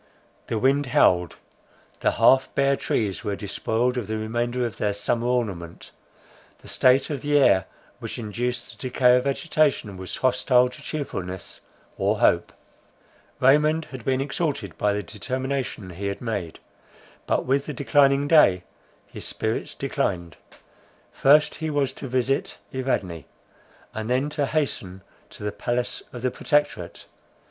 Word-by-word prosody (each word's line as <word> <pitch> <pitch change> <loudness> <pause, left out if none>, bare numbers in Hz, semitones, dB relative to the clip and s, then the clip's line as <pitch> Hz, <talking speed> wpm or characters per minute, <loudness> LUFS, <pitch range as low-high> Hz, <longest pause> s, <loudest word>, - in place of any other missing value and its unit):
The 115 - -1
wind 135 +4 +2
howled; 90 -7 +3 0.6
the - - +1
half 130 0 +4
bare 140 0 +3
trees 105 -7 -2
were 100 - -2
despoiled 115 +5 -1
of 115 -5 -3
the 110 0 -2
remainder 120 +3 -1
of 115 -4 -5
their 105 -1 0
summer 115 +3 -1
ornament; 100 -9 -3 0.7
the - - -15
state 130 +3 +3
of 140 -3 -3
the 145 0 +2
air 95 -10 +4 0.3
which - - -6
induced 120 +2 -3
the 130 - -3
decay 125 0 +5
of 125 - -1
vegetation, 140 - +1
was 95 0 -5
hostile 125 -1 +3
to 125 - -12
cheerfulness 95 - -5 0.4
or - - +1
hope. - - +3 0.9
Raymond 150 +4 +4
had 130 -4 -8
been 130 +1 +1
exalted 140 - -2
by 105 - +1
the 105 0 -2
determination 125 +2 -4
he 100 +3 -5
had 100 0 -3
made; 100 -9 -4 0.7
but - - +1
with 135 +2 +1
the - - -3
declining 140 +1 +3
day 100 - +5 0.4
his - - -9
spirits - - -3
declined. 85 -3 -2 0.8
First 150 +2 +4
he 160 - -1
was 140 -3 0
to 135 - -7
visit 130 +2 -1 0.2
Evadne, 95 - -2 0.7
and 110 +1 -4
then 130 +4 +1
to 145 -2 -1
hasten 100 - -2 0.3
to - - -11
the 105 - -1
palace 120 +3 -2
of 120 -1 -8
the 130 - +1
Protectorate. 145 +3 -1
125 Hz, 145 wpm, -24 LUFS, 105-140 Hz, 0.9 s, decay